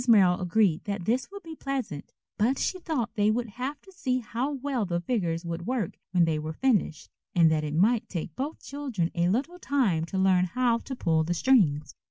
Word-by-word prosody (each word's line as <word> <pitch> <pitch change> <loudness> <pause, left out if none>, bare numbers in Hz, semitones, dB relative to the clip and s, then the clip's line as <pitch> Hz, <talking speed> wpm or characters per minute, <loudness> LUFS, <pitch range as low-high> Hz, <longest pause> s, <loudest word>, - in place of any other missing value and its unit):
Merrill 190 -6 +5
agreed 180 -2 +2
that 200 -4 -3
this 245 +5 0
would 400 -1 -10
be 325 -1 -8
pleasant, 270 - -4 0.2
but 245 +6 +2
she 370 - -1
thought 285 -10 -2
they 210 -1 +2
would 230 +1 0
have 255 +7 -5
to 385 - -16
see 280 -10 -1
how 245 +3 -2
well 270 -3 -2
the 175 -3 -1
figures 175 -4 -1
would 170 +1 -4
work 240 -8 -1
when 180 -2 +3
they 160 -2 0
were 155 +1 -4
finished, 210 - 0 0.2
and 165 -2 +6
that 155 -1 +1
it 150 0 -3
might 215 +7 +3
take 165 -3 -5
both 285 +4 -4
children 260 -12 -3
a 175 0 +1
little 280 - -1
time 220 - +1
to 190 - -4
learn 190 -1 +4
how 235 +5 +1
to 265 - -6
pull 160 -8 +1
the 175 +2 -1
strings. 165 - +3
210 Hz, 210 wpm, -27 LUFS, 170-260 Hz, 0.2 s, and